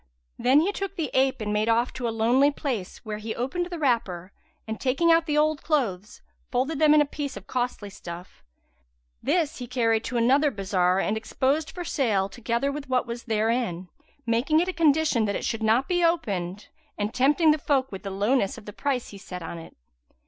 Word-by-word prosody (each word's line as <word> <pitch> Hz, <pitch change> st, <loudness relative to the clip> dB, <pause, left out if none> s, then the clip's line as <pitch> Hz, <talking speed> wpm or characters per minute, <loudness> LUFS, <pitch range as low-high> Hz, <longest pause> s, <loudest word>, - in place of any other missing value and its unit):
Then 270 Hz, +4 st, +5 dB
he 375 Hz, +5 st, +1 dB
took 395 Hz, -1 st, -5 dB
the 320 Hz, -7 st, -3 dB
ape 265 Hz, -2 st, +2 dB
and 210 Hz, -1 st, -2 dB
made 215 Hz, +2 st, +1 dB
off 235 Hz, +2 st, +2 dB
to 250 Hz, -2 st, -3 dB
a -, -, 0 dB
lonely 235 Hz, +5 st, +3 dB
place, 255 Hz, -7 st, -4 dB
where 210 Hz, -1 st, -4 dB
he 220 Hz, +1 st, -5 dB
opened 345 Hz, +9 st, -2 dB
the 350 Hz, -1 st, -6 dB
wrapper 205 Hz, -, -1 dB, 0.4 s
and, 220 Hz, 0 st, -4 dB
taking 280 Hz, +6 st, +2 dB
out 330 Hz, 0 st, +4 dB
the 300 Hz, -1 st, +1 dB
old 305 Hz, 0 st, +2 dB
clothes, 215 Hz, -, -2 dB, 0.3 s
folded 270 Hz, +4 st, -1 dB
them 305 Hz, -1 st, +6 dB
in 300 Hz, -, +6 dB
a -, -, +3 dB
piece 285 Hz, -1 st, -5 dB
of -, -, -10 dB
costly 245 Hz, -5 st, -3 dB
stuff. 175 Hz, -2 st, -10 dB, 0.8 s
This 330 Hz, -6 st, 0 dB
he 245 Hz, -, -6 dB
carried 230 Hz, -3 st, +1 dB
to 240 Hz, +1 st, -2 dB
another 270 Hz, +6 st, +4 dB
bazar 190 Hz, -5 st, +1 dB
and 210 Hz, +2 st, 0 dB
exposed 270 Hz, +7 st, 0 dB
for 355 Hz, +2 st, -6 dB
sale 215 Hz, -11 st, +1 dB
together 235 Hz, +5 st, -1 dB
with 285 Hz, -1 st, -7 dB
what 255 Hz, -2 st, +1 dB
was 235 Hz, 0 st, -6 dB
therein, 220 Hz, -5 st, -1 dB, 0.4 s
making 240 Hz, +7 st, +2 dB
it 350 Hz, -, +1 dB
a 370 Hz, -, -2 dB
condition 310 Hz, -7 st, +3 dB
that 200 Hz, -, -1 dB
it -, -, -3 dB
should 225 Hz, -, -2 dB
not 225 Hz, +4 st, +2 dB
be 355 Hz, -1 st, +1 dB
opened, 205 Hz, -, -1 dB, 0.3 s
and 210 Hz, +1 st, -2 dB
tempting 295 Hz, +5 st, +4 dB
the 305 Hz, -, +1 dB
folk 270 Hz, -2 st, 0 dB
with 195 Hz, -, -7 dB
the 200 Hz, -, -5 dB
lowness 200 Hz, +2 st, +1 dB
of -, -, -12 dB
the 210 Hz, -, -8 dB
price 270 Hz, -1 st, -2 dB
he 200 Hz, -, -11 dB
set 180 Hz, -2 st, -8 dB
on 165 Hz, +1 st, -6 dB
it. 165 Hz, -, -12 dB
245 Hz, 205 wpm, -26 LUFS, 210-295 Hz, 0.8 s, them